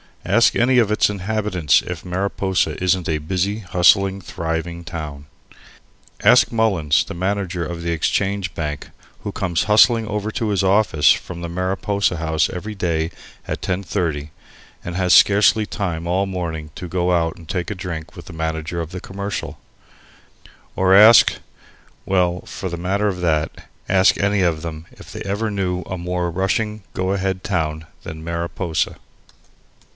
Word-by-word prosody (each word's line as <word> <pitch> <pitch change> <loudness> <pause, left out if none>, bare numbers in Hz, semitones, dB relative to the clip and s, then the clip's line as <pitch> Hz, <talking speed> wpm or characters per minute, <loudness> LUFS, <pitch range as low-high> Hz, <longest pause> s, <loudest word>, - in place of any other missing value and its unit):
Ask - - +4
any 125 +2 +3
of 110 -4 +3
its 105 - +3
inhabitants 100 -6 +1
if 90 0 -7
Mariposa 95 0 -1
isn't 90 -1 +1
a 80 - +1
busy, 95 +7 -1
hustling, 95 +1 +3
thriving 85 0 -4
town. 75 -4 -7 1.0
Ask - - +6
Mullins, 95 -10 +2
the - - -8
manager 95 -1 -2
of 85 +1 -6
the 85 0 -2
Exchange 95 +3 -1
Bank, 75 -3 -4 0.3
who - - -5
comes 85 -3 -1
hustling 110 +1 +4
over 105 0 -3
to 110 0 -2
his 100 -1 +1
office 95 -5 +4
from 85 -1 -3
the 85 - -5
Mariposa 95 +1 -1
House 80 -1 0
every 105 +4 -6
day 85 -4 -1 0.4
at - - -4
10.30 90 -5 -2 0.5
and 85 - -5
has 90 -1 +2
scarcely 105 +2 +5
time 85 -6 -3
all 95 +3 +1
morning 85 -5 -5
to 90 - -6
go 90 +1 0
out 80 -2 +1
and 85 - -14
take 90 -2 -2
a 105 - -3
drink 85 -4 -6
with - - -10
the - - -10
manager 80 +1 -3
of 80 -1 -5
the 90 -1 -6
Commercial; 100 +1 -5 1.2
or 95 0 +4
ask 110 +3 +8 0.7
well, 90 -2 +1
for 95 - -5
the 85 - -5
matter 95 +4 0
of 90 -3 -2
that, 80 -3 -1 0.2
ask 95 0 +4
any 100 0 +2
of 85 -4 +1
them 80 -1 -6
if - - -14
they - - -7
ever 105 +3 -2
knew 90 -3 -1
a 95 - -5
more 90 0 -2
rushing 105 +4 -1
go 95 +1 -1
a 100 - 0
head 95 -1 -2
town 80 -4 -2 0.2
than 80 0 -8
Mariposa. 85 0 -2
90 Hz, 160 wpm, -20 LUFS, 85-100 Hz, 1.2 s, ask